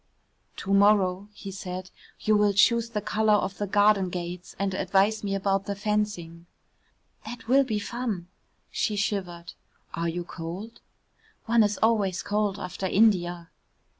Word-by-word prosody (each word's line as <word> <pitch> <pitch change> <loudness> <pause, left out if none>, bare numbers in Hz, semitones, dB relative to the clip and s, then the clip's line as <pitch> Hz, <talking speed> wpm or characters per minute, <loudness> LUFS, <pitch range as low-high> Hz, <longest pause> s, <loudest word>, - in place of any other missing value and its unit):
"To 195 - -3
morrow," 200 -1 +3
he 200 -1 -9
said, 185 -1 -6 0.3
"you 215 - +3
will 205 -1 +3
choose 230 +3 +4
the 210 -3 -3
colour 215 0 +2
of 195 -1 -2
the 205 - -1
garden 205 -1 +3
gates 175 0 -6
and 195 -1 -1
advise 200 +3 +1
me 195 -1 -1
about 195 0 0
the 200 - -2
fencing." 200 -5 -2 0.8
"That 235 +1 -9
will 270 +3 +5
be 225 -5 -2
fun." 210 -4 -4 0.4
She 215 - -1
shivered. 180 -4 -3 0.4
"Are 170 0 -1
you 175 +1 -3
cold?" 180 +7 -7 0.7
"One 235 0 +4
is 210 -1 +2
always 205 -5 +2
cold 205 -1 0
after 190 0 -4
India." 175 -5 +2
200 Hz, 145 wpm, -26 LUFS, 185-210 Hz, 0.8 s, will